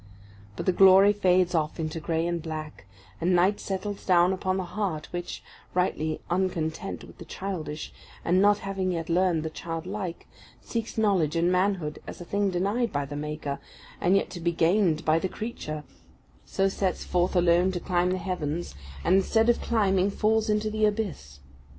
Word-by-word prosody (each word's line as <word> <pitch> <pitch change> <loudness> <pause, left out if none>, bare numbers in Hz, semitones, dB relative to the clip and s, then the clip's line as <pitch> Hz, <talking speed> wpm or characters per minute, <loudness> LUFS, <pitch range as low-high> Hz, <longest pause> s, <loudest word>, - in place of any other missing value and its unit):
But - - -5
the 185 - +4
glory 195 +2 +7
fades 185 -3 +3
off 155 0 -1
into 160 0 -3
grey 160 +1 -1
and 170 -1 -1
black, 155 - -7 0.3
and 180 +1 +3
night 185 +4 +3
settles 200 +1 -4
down 180 0 +4
upon 185 0 -1
the 190 - -1
heart 180 -5 -3
which, 175 0 -5 0.3
rightly 160 -4 0
uncontent 175 0 -2
with - - -14
the - - -7
childish, 160 -6 -5 0.3
and 180 +2 +3
not 205 0 +5
having 190 -1 -1
yet 165 -1 -4
learned 175 -2 +2
the 160 - -4
childlike, 175 +3 -5 0.3
seeks 230 -1 -4
knowledge 190 -8 +2
and 170 +2 +2
manhood 185 -5 0
as - - -8
a 175 - -8
thing 200 +2 0
denied 200 +6 0
by 145 -1 -1
the 145 +1 -7
Maker, 150 -1 -4 0.4
and 180 +3 +4
yet 195 - +1
to 175 - -6
be 170 0 0
gained 170 -1 +2
by 160 +1 +4
the 190 - -2
creature; 155 -10 -5 0.6
so 195 0 +1
sets 190 -1 -1
forth 180 +1 0
alone 175 +1 +4
to 180 - -3
climb 180 0 +1
the 185 - 0
heavens, 175 -3 -3 0.3
and 190 - +4
instead 225 +4 +3
of 240 - +3
climbing, 195 -4 +2
falls 220 +2 +1
into 210 0 +1
the 215 0 -1
abyss. 200 - -1
180 Hz, 175 wpm, -27 LUFS, 165-195 Hz, 0.6 s, glory